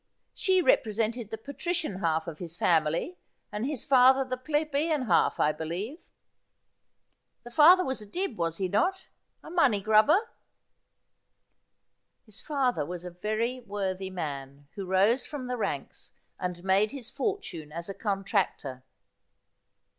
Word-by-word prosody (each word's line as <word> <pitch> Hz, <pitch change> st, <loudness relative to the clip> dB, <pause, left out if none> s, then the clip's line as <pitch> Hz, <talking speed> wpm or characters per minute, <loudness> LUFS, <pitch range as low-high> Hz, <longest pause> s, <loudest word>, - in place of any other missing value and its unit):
She 375 Hz, -3 st, +2 dB
represented 225 Hz, -, +1 dB
the 220 Hz, -, -5 dB
patrician 285 Hz, -, -3 dB
half 160 Hz, -3 st, 0 dB
of 160 Hz, -3 st, -7 dB
his 170 Hz, -1 st, -5 dB
family, 165 Hz, -, +1 dB, 0.3 s
and 210 Hz, +4 st, -2 dB
his 290 Hz, -5 st, -3 dB
father 265 Hz, 0 st, +6 dB
the 255 Hz, 0 st, -2 dB
plebeian 300 Hz, +2 st, 0 dB
half, 175 Hz, -7 st, +2 dB
I 150 Hz, -, +4 dB
believe? 175 Hz, -, -5 dB, 1.4 s
The 240 Hz, -, -11 dB
father 345 Hz, +7 st, +7 dB
was 265 Hz, -3 st, -2 dB
a 210 Hz, -, -9 dB
Dibb, 355 Hz, -, -3 dB
was 165 Hz, -3 st, -2 dB
he 190 Hz, -, -1 dB
not 375 Hz, -, 0 dB, 0.2 s
— -, -, -48 dB
a -, -, -10 dB
money 280 Hz, -, +3 dB
grubber 220 Hz, -, +4 dB, 0.8 s
' -, -, -51 dB
His 215 Hz, -2 st, -8 dB
father 270 Hz, -, 0 dB
was 175 Hz, +3 st, -6 dB
a 180 Hz, -, -6 dB
very 215 Hz, +7 st, -2 dB
worthy 195 Hz, -4 st, -3 dB
man, 140 Hz, -5 st, -6 dB
who 195 Hz, -2 st, -6 dB
rose 200 Hz, +7 st, +3 dB
from 285 Hz, -4 st, -6 dB
the 250 Hz, 0 st, -2 dB
ranks, 230 Hz, -, -4 dB, 0.3 s
and 180 Hz, -1 st, -4 dB
made 195 Hz, +3 st, +3 dB
his 255 Hz, -3 st, -7 dB
fortune 200 Hz, -, -4 dB
as 170 Hz, +2 st, -5 dB
a 195 Hz, -, -4 dB
contractor.' 195 Hz, -, -2 dB
215 Hz, 145 wpm, -28 LUFS, 180-275 Hz, 1.4 s, father